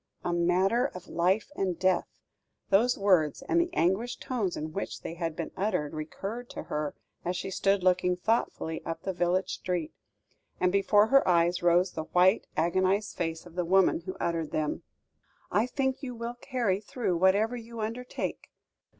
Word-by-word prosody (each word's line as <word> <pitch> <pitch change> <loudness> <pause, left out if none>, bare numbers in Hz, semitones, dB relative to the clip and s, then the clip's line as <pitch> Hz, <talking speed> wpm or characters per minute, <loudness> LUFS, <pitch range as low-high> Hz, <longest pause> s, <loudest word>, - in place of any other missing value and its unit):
"A 175 - 0
matter 185 +8 +2
of 180 - -9
life 185 +9 +1
and 185 - -1
death!" 185 -2 +2 0.6
Those 230 +6 +4
words, 185 - +2
and 335 +5 +2
the 340 - -1
anguished 215 - 0
tones 215 -9 -2
in 155 +1 -5
which 195 - -4
they - - -5
had 165 -2 -3
been 165 - -4
uttered, 185 -7 -1
recurred 195 +10 -5
to - - -6
her, 150 -1 -3 0.3
as 180 +1 -2
she 190 - -4
stood 195 0 +1
looking 180 0 +3
thoughtfully 180 -5 -1
up 165 - -5
the 190 - -2
village 175 +2 0
street, 180 -4 -3 0.7
and 180 0 +3
before 205 +2 +4
her 275 0 +5
eyes 175 0 +3
rose 175 +1 +3
the 160 - -5
white, 185 +5 +3
agonised 185 +5 +1
face 165 -1 -3
of 175 - -13
the 180 +1 -1
woman 185 0 +4
who 185 +2 -7
uttered 165 -2 -1
them. 155 -1 -2 0.7
"I 210 +5 +2
think 265 0 -1
you 250 -3 -5
will 235 +1 -4
carry 240 -6 -1
through 210 -4 -2
whatever 200 +6 +3
you 230 -1 -8
undertake." 230 +3 -4
185 Hz, 170 wpm, -29 LUFS, 175-220 Hz, 0.7 s, her